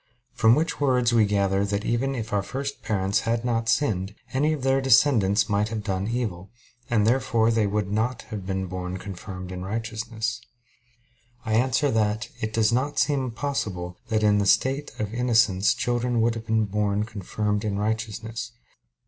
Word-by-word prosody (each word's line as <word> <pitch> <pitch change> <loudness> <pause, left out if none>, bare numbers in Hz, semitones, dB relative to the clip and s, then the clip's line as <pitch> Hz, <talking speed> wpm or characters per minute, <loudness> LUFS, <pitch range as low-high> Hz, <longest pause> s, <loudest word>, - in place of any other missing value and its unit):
From 115 +1 +5
which 160 0 -1
words 125 -4 +3
we 110 -2 +5
gather 100 -1 +1
that 100 +1 -2
even 135 +4 0
if 110 -3 -5
our 100 - +2
first 140 +6 -5
parents 100 0 0
had 115 +1 -1
not 115 -2 0
sinned, 105 -6 0 0.2
any 145 +4 +2
of 150 -4 -3
their 135 0 +2
descendants 115 -6 +4
might 105 +1 +1
have 110 -1 -4
done 95 -1 -2
evil; 110 -6 -3 0.4
and 110 -3 +2
therefore 120 -2 +2
they 110 -2 +2
would 100 -1 -1
not 110 +4 -1
have 105 -3 -4
been 95 0 -2
born 90 0 -5
confirmed 95 -1 -8
in 90 0 -5
righteousness. 115 +2 -3 1.0
I 110 - -1
answer 130 +4 +2
that, 110 +1 0
It 110 - -2
does 110 0 +2
not 130 +5 0
seem 135 -4 +1
possible 105 -9 -3
that 110 -1 0
in 105 -1 +4
the 100 - +1
state 135 +7 +2
of 105 0 -3
innocence 115 -5 +3
children 120 0 0
would 115 +1 +2
have 115 -1 -7
been 110 -1 +2
born 105 0 0
confirmed 105 0 -2
in 105 -2 -1
righteousness. 110 +2 -3
110 Hz, 175 wpm, -25 LUFS, 100-120 Hz, 1.0 s, From